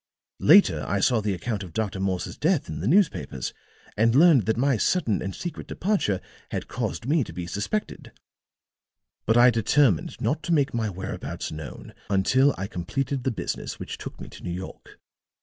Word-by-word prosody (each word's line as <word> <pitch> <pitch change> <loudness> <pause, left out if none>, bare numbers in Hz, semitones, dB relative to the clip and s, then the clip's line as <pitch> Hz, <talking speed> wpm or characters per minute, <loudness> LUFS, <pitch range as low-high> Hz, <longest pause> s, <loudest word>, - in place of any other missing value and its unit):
"Later 145 - +6
I 100 +2 0
saw 115 +3 +3
the 105 -2 -1
account 105 +3 -3
of 90 -4 -8
Dr. 105 -2 -2
Morse's 95 -2 -2
death 165 -1 +1
in 75 - -5
the 95 - -2
newspapers 155 - +1 0.4
and 115 +2 +3
learned 145 - +6
that 110 - +1
my 135 +2 +3
sudden 115 - +1
and 95 +1 -4
secret 175 - -6
departure 180 - 0 0.3
had - - -4
caused - - -3
me 150 +2 +2
to - - -9
be 90 - -5
suspected. 105 - -4 1.2
But 110 +2 +4
I 120 +1 +7
determined 115 - +2
not 155 +2 0
to 170 +2 -1
make 145 -3 +2
my 115 -2 -1
whereabouts 95 0 -5
known 75 -3 -8 0.2
until 130 +8 +3
I 95 - -3
completed 125 +8 -3
the - - +3
business 115 - -4
which - - -6
took - - -8
me - - -8
to - - -13
New - - -4
York. 90 +2 -8
110 Hz, 180 wpm, -25 LUFS, 95-140 Hz, 1.2 s, I